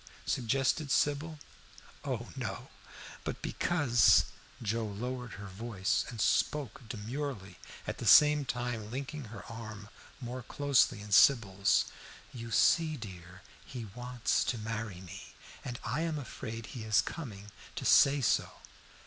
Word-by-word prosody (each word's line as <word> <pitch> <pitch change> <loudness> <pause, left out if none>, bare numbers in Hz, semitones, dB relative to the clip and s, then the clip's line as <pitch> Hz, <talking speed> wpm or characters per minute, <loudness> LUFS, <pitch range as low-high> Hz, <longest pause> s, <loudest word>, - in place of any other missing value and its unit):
suggested 135 +5 0
Sybil. 145 +3 +1 0.7
"Oh - - -3
no! - - -5 0.5
But - - -5
because" 125 - +4 0.3
Joe 115 -1 -1
lowered 125 +3 -5
her 100 - -8
voice 100 +1 -1
and 115 - -8
spoke 140 +1 +1
demurely, 115 -4 -5 0.3
at - - -4
the - - -3
same 150 0 +8
time 120 -4 -3
linking 135 +3 -5
her 115 +1 -10
arm 110 -3 -8 0.3
more 125 0 -5
closely 140 -4 +2
in 105 0 -10
Sybil's. 100 -4 +5 0.5
"You 115 -1 -7
see, 155 +6 +3
dear, 95 -3 -10 0.2
he 125 -4 -7
wants 125 -1 0
to 120 - -1
marry 110 -4 -5
me, 95 +2 -10 0.3
and 120 -1 -5
I 145 +5 -1
am 165 -2 -1
afraid 115 -5 -6
he 115 0 -7
is 110 -2 +3
coming 105 -10 -7 0.2
to - - -5
say 140 0 +6
so." 120 - +1
115 Hz, 130 wpm, -32 LUFS, 105-135 Hz, 0.7 s, same